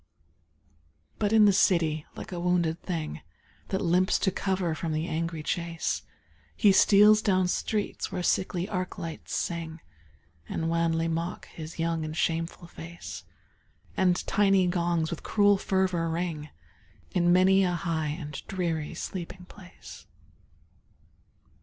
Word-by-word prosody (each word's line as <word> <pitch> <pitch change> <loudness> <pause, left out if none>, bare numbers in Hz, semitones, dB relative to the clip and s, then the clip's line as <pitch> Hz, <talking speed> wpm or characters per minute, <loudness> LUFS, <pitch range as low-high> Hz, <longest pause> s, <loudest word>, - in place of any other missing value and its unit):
But 205 -1 +1
in 220 -1 +6
the 200 - +5
city, 165 -5 +2
like - - -8
a 175 - -4
wounded 175 -2 +1
thing 160 - -4 0.5
That 190 - -2
limps 180 +2 +3
to 190 - +2
cover 185 -3 -1
from 160 0 -3
the 155 +1 -1
angry 165 -1 -3
chase, 170 0 -2 0.5
He 205 - +5
steals 210 +2 +6
down 185 -4 +2
streets 210 +3 -2
where 180 -2 -3
sickly 180 0 0
arc 185 -2 -3
lights 165 -1 -6
sing, 165 -1 -3 0.7
And 165 0 -2
wanly 165 -1 +1
mock 165 +2 -3
his 160 0 -9
young 165 -1 -1
and 155 +1 -5
shameful 165 +1 -1
face; 170 0 -9 0.7
And 180 -2 +2
tiny 195 -2 +3
gongs 170 -2 0
with 170 - -5
cruel 205 -2 +3
fervor 185 -4 0
ring 160 -3 -3 0.6
In 175 -1 +3
many 190 +2 +5
a 180 -1 +1
high 165 -3 -1
and 150 0 -5
dreary 170 -5 -2
sleeping 180 0 -6
place. 185 -1 -13
175 Hz, 135 wpm, -28 LUFS, 165-190 Hz, 0.7 s, in